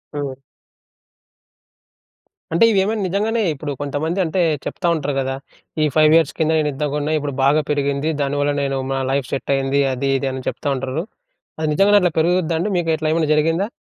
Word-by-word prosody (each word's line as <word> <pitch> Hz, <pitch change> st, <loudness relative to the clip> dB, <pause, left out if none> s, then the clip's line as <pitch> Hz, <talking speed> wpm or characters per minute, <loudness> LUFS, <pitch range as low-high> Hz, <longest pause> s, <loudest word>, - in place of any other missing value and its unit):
హ్మ్. 140 Hz, -3 st, -4 dB, 2.2 s
అంటే 170 Hz, +8 st, +5 dB
ఇవి 200 Hz, -, +3 dB
ఏమైనా 215 Hz, +1 st, -1 dB
నిజంగానే 215 Hz, +5 st, 0 dB
ఇప్పుడు 145 Hz, 0 st, -5 dB
కొంతమంది 155 Hz, +6 st, -2 dB
అంటే 175 Hz, +3 st, 0 dB, 0.2 s
చెప్తా 175 Hz, -, -3 dB
ఉంటారు 145 Hz, -2 st, -2 dB
గదా! 135 Hz, 0 st, -1 dB, 0.5 s
ఈ -, -, +4 dB
5 155 Hz, 0 st, +5 dB
ఇయర్స్ 165 Hz, -1 st, +3 dB
కింద 160 Hz, -1 st, +1 dB
నేను 150 Hz, -1 st, +1 dB
ఇంతకొన్న 150 Hz, +2 st, -1 dB
ఇప్పుడు 145 Hz, -2 st, -3 dB
బాగా 150 Hz, +3 st, +4 dB
పెరిగింది. 140 Hz, +1 st, 0 dB
దానివల్ల 145 Hz, +1 st, 0 dB
నేను 135 Hz, -1 st, -1 dB
మా 135 Hz, -, 0 dB
లైఫ్ 135 Hz, -2 st, -1 dB
సెట్ 140 Hz, -, -2 dB
అయింది 135 Hz, +1 st, +1 dB
అది, 135 Hz, +2 st, -2 dB
ఇది 135 Hz, -, -1 dB
అని 130 Hz, -1 st, -6 dB
చెప్తా -, -, -3 dB
ఉంటారు. 135 Hz, +4 st, -3 dB, 0.6 s
అది 155 Hz, -, -1 dB
నిజంగానే 205 Hz, +5 st, +5 dB
అట్లా 180 Hz, -2 st, +2 dB
పెరుగుద్దా 170 Hz, 0 st, +1 dB
అండి? 205 Hz, +5 st, -1 dB
మీకు 170 Hz, -2 st, -1 dB
ఇట్లా 155 Hz, 0 st, -3 dB
ఏమన్నా 160 Hz, -2 st, 0 dB
జరిగిందా? 165 Hz, +6 st, +1 dB
150 Hz, 175 wpm, -20 LUFS, 140-165 Hz, 2.2 s, అంటే